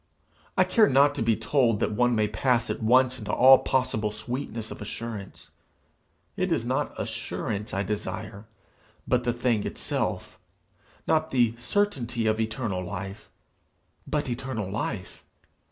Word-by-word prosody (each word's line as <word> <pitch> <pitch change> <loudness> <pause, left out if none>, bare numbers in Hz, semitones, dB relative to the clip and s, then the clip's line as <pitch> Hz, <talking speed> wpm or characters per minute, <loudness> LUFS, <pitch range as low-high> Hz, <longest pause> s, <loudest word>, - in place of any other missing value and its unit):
I - - +6
care 220 -3 +4
not 140 +2 +5
to - - -4
be 115 0 +3
told 115 -1 +2
that - - 0
one 120 +3 +2
may 105 -1 +2
pass 120 +2 +1
at - - -5
once 130 +3 +4
into 105 -2 -4
all 130 +1 +8
possible 125 -5 0
sweetness 115 -1 -5
of - - -8
assurance; 105 -1 -7 0.8
it - - -1
is - - +1
not - - -2
assurance 105 0 -4
I 95 - -1
desire, 105 0 -5 0.6
but 125 -1 +1
the 120 - +2
thing 120 -3 0
itself; - - -3 0.7
not 160 0 +2
the 120 -5 +2
certainty 125 - 0
of 110 0 +1
eternal 110 -4 -2
life, 100 +2 -7 0.8
but 150 -1 -1
eternal 120 -5 -3
life. 105 -2 -4
115 Hz, 140 wpm, -26 LUFS, 105-130 Hz, 0.8 s, all